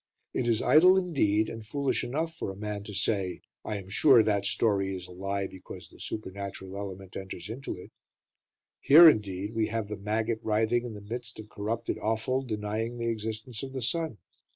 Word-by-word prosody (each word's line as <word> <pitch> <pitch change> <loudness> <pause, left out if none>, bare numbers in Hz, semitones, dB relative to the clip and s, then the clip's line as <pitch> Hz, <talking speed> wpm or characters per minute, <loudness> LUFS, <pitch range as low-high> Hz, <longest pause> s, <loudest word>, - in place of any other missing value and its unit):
It 120 - 0
is 115 -1 +2
idle, 180 +5 +7
indeed, 110 - +2
and 115 -1 -7
foolish 140 +5 -1
enough 155 +7 -2
for - - -4
a 95 - -6
man 105 0 -4
to 105 - -7
say: 95 -3 0 0.2
"I 105 - -3
am 95 -2 -8
sure 115 +4 +6
that 100 -2 +1
story 100 -3 +1
is 90 -1 -7
a - - -13
lie, 100 +2 -2
because 95 -1 -10
the - - -18
supernatural 100 -2 -6
element 95 -1 -7
enters 95 +1 -6
into 130 -1 -5
it;" 90 - -12 0.9
here, 165 +4 +9
indeed, 105 - +2
we 110 -1 +1
have 110 -1 -3
the 105 - -4
maggot 110 +3 -1
writhing 110 +3 +1
in 115 -3 -6
the 105 - -9
midst 120 +1 -5
of 105 -1 -9
corrupted 110 +3 -3
offal 115 +4 0
denying 110 0 -3
the 115 0 -1
existence 110 +1 -4
of 135 -1 -6
the 130 - -3
sun. 155 -1 0
110 Hz, 190 wpm, -29 LUFS, 100-120 Hz, 0.9 s, here